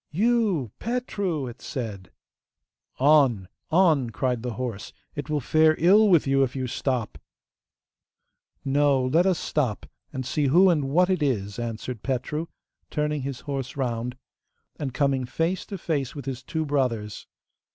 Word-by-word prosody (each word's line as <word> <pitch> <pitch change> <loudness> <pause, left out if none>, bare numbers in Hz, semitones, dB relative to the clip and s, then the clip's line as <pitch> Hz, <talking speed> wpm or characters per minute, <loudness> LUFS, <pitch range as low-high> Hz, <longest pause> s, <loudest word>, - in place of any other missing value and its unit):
'You, 200 - +1
Petru!' 205 - -2
it 120 -1 -9
said. 105 -9 -5 0.9
'On! 135 -9 +4 0.2
on!' 160 -8 +3
cried 125 +1 -1
the 125 -1 -4
horse; 115 -3 -5 0.2
'it 145 +1 -6
will 150 -1 +1
fare 155 +2 +4
ill 205 +6 +5
with 170 -5 +5
you 135 0 +2
if 135 -1 0
you 130 -1 -2
stop.' 120 - -2 1.5
'No, 140 -1 +3
let 165 +8 +3
us 185 -3 +2
stop, 130 -11 -1 0.3
and 130 -1 -4
see 145 +2 0
who 180 +7 +6
and 145 -5 0
what 180 +6 +3
it 185 -4 0
is!' 105 -7 -1
answered 115 0 -5
Petru, 150 +5 -2 0.4
turning 150 -1 -1
his 135 -1 -5
horse 135 -2 -5
round, 125 -1 -2 0.6
and 140 -3 -3
coming 135 -1 +1
face 165 +8 -2
to 200 - -5
face 150 -7 -2
with 140 -3 -7
his 130 -2 -4
two 160 +4 -3
brothers. 125 -8 -1
140 Hz, 150 wpm, -25 LUFS, 125-160 Hz, 1.5 s, who